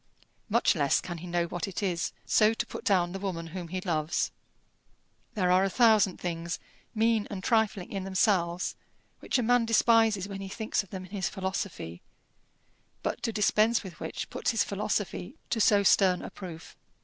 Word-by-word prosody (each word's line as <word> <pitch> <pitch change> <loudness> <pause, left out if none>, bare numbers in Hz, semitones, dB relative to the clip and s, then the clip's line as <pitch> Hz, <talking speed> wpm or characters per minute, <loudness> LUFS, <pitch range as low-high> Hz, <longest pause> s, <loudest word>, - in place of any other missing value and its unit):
Much 235 +3 +3
less 145 -5 +2
can 175 -2 -6
he 180 - -8
know 175 0 0
what 175 +2 -4
it 195 +1 -4
is 175 -3 -1
so 220 +1 +4
to 235 - -2
put - - -8
down 185 -6 +2
the 195 - -5
woman 185 -4 -3
whom 170 +1 -6
he 185 +3 -3
loves. 160 -3 -1 1.0
There 180 -4 +2
are 185 +1 +5
a 195 - +1
thousand 215 -4 +4
things, 170 -1 -3 0.4
mean 225 -1 +2
and 190 -2 -6
trifling 220 -5 +1
in 195 -2 -3
themselves, 185 -2 +1 0.4
which - - 0
a 245 - +1
man 245 +1 +4
despises 225 -3 +3
when 195 -1 -6
he 195 - -6
thinks 220 +2 -1
of 200 - -16
them 185 0 -6
in 185 - -17
his 195 -3 -1
philosophy, 190 - -4 1.0
but - - -2
to 230 - -1
dispense 215 +2 +2
with 180 -5 -10
which - - -5
puts - - -1
his 225 - +2
philosophy 205 +2 -3 0.2
to 225 - +1
so 205 -1 +5
stern 190 -2 +4
a - - -7
proof. 170 -4 -9
195 Hz, 185 wpm, -29 LUFS, 175-215 Hz, 1.0 s, are